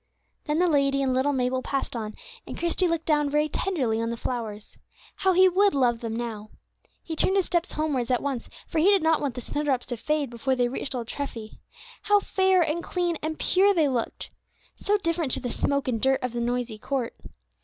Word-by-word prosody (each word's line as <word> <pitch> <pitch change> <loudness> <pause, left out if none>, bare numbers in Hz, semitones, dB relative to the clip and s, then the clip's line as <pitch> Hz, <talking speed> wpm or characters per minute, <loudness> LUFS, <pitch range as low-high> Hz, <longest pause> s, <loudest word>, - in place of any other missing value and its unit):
Then 300 0 0
the 360 - +3
lady 275 -3 +2
and 260 -1 +1
little 260 +3 +2
Mabel 255 -1 0
passed 270 -1 -3
on, 215 -2 -4 0.3
and - - -6
Christie 345 +2 +1
looked 335 -1 -1
down 295 -2 +2
very 300 +1 +2
tenderly 265 -10 -1
on 230 - -1
the 235 - -3
flowers. 220 -4 -5 0.4
How 380 -1 +2
he 375 +1 +6
would 390 0 +3
love 245 -4 +2
them 230 -1 -4
now! 225 -3 -5 0.5
He 325 - -5
turned 380 +4 +2
his 385 -2 +3
steps 345 -2 -1
homewards 290 -6 -1
at 250 -1 +1
once, 275 -4 -3 0.2
for 325 - -2
he 315 - +3
did 395 -3 +5
not 320 -1 +3
want 275 -4 -2
the 250 - -5
snowdrops 280 -2 -1
to 245 - -4
fade 295 +1 -1
before 260 +3 -1
they 245 -1 +2
reached 265 +1 -3
old 235 -2 -4
Treffy. 235 -6 -6 0.4
How 415 0 +4
fair, 380 -2 +2
and 320 +2 -1
clean, 350 -3 -1
and 315 0 -3
pure 390 +2 +3
they 315 -4 +3
looked! 250 -4 -3 0.4
So 415 +1 +1
different 335 -7 -1
to - - 0
the 245 -2 -4
smoke 280 -1 0
and 230 -4 -1
dirt 265 0 +2
of 250 -2 -2
the 240 - -2
noisy 240 -2 -2
court. 260 0 -2
280 Hz, 215 wpm, -26 LUFS, 245-330 Hz, 0.5 s, he